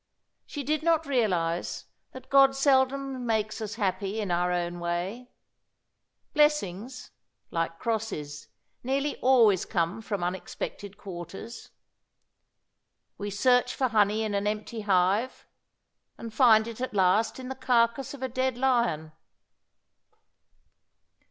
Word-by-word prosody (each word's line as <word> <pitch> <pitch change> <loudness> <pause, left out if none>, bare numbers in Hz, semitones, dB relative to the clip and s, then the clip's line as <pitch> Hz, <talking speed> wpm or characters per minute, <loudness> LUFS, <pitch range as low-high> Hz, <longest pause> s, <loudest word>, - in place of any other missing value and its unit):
She 290 - -5
did 305 +3 0
not 325 -1 +2
realize 180 - -1 0.3
that 260 0 -12
God 270 -1 +6
seldom 270 -1 +1
makes 220 -1 -1
us 215 0 -4
happy 200 0 -2
in 205 -4 -2
our 175 +1 +1
own 175 0 -2
way. 180 +8 -3 1.0
Blessings, 255 -6 0 0.4
like 165 0 -2
crosses, 195 -11 -4 0.3
nearly 275 +3 -1
always 230 -7 +4
come 175 +5 -1
from 205 -4 -3
unexpected 190 +2 -5
quarters. 190 +4 -9 1.5
We 205 0 -3
search 250 +4 +2
for 260 -2 0
honey 215 0 +2
in 215 -1 -2
an 200 +1 0
empty 215 +2 -3
hive, 200 +5 +1 0.7
and 230 -1 -8
find 225 -4 +5
it 230 +1 -7
at 255 -4 -4
last 195 +6 +2
in 255 0 -7
the - - -3
carcase 250 +1 +1
of 265 - -9
a - - 0
dead 255 0 -1
lion. 235 -12 +1
220 Hz, 120 wpm, -27 LUFS, 190-260 Hz, 1.5 s, God